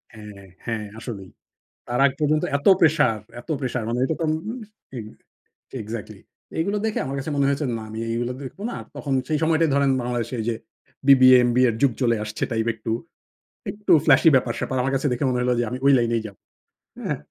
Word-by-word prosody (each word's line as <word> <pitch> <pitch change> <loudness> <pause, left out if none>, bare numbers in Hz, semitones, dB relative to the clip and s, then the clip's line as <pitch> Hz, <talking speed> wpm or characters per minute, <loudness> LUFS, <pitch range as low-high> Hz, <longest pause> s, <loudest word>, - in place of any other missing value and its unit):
হ্যাঁ, 105 -2 -11 0.2
হ্যাঁ, 110 -2 -3
আসলেই। 100 -6 -7 0.6
তার 120 +1 -1
আগ 140 - +1
পর্যন্ত 150 0 +2
এতো 140 +7 +4
প্রেশার 150 -9 +3 0.2
এতো 140 - -5
প্রেশার 125 -2 -2
মানে 120 +1 -1
এটা 145 - 0
তো - - 0
উম - - +1 0.2
আম 245 - -5 0.4
এক 110 - -6 0.8
এক্সাক্টলি। 110 0 -7 0.4
এগুলো 200 +6 0
দেখে 220 - -1
আমার 135 +1 -4
কাছে 135 +3 -4
মনে 140 -1 +2
হয়েছে, 140 +1 0
না 110 - -7
আমি 110 +1 -6
এইগুলো 120 +2 -1
দেখব 135 +8 -9
না। - - -5 0.2
তখন 140 -2 -3
সেই 155 - +1
সময়টাই 160 0 +3
ধরেন 140 -1 +3
বাংলাদেশে 120 0 -3
এইযে 115 +1 -1 0.5
বিবিএ, 130 -2 +8
এমবিএর 120 -1 +3
যুগ 140 -2 +4
চলে 120 -2 +3
আসছে 105 0 -4
টাইপ 110 0 -1
একটু। 110 0 -5 0.8
একটু 205 -1 -3
flashy 150 +2 +6
ব্যাপার-স্যাপার। 130 +1 0
আমার 135 +2 -1
কাছে 135 +2 0
দেখে 125 +3 -1
মনে 125 -1 0
হলো 125 0 +2
যে - - +2
আমি 125 - -4
ঐ - - +6
লাইনেই 115 -1 +1
যাবো। 100 - -14 0.7
হ্যাঁ? - - -1
125 Hz, 190 wpm, -23 LUFS, 115-140 Hz, 0.8 s, বিবিএ